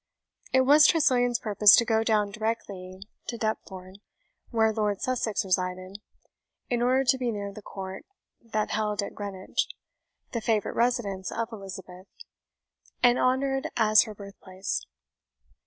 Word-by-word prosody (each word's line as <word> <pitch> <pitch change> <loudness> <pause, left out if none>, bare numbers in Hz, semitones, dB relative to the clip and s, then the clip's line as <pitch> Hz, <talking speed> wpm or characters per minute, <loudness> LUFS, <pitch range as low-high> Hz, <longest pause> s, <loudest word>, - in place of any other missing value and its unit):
It 260 - +4
was 290 +3 +7
Tressilian's 245 -7 +3
purpose 210 -2 +6
to 235 - +3
go 225 -1 +2
down 210 -2 +1
directly 195 -4 -5 0.2
to 235 - -4
Deptford, 190 -4 -5 0.5
where 220 -2 +2
Lord 210 -2 -1
Sussex 235 -6 -1
resided, 185 +1 -2 0.7
in 240 -1 +1
order 255 +2 +3
to 265 0 +3
be 250 -2 -1
near 200 -2 -4
the 215 - -10
court, 190 -1 -8 0.4
then 215 -2 -2
held 210 -1 -1
at - - -6
Greenwich, 195 -2 -3 0.6
the 235 - -3
favourite 220 -1 0
residence 220 -6 0
of 230 0 -3
Elizabeth, 190 -3 -9 1.0
and 245 0 +5
honoured 270 +1 +1
as 215 -2 +6
her 215 -2 -9
birthplace. 195 -1 -6
215 Hz, 135 wpm, -27 LUFS, 195-240 Hz, 1.0 s, was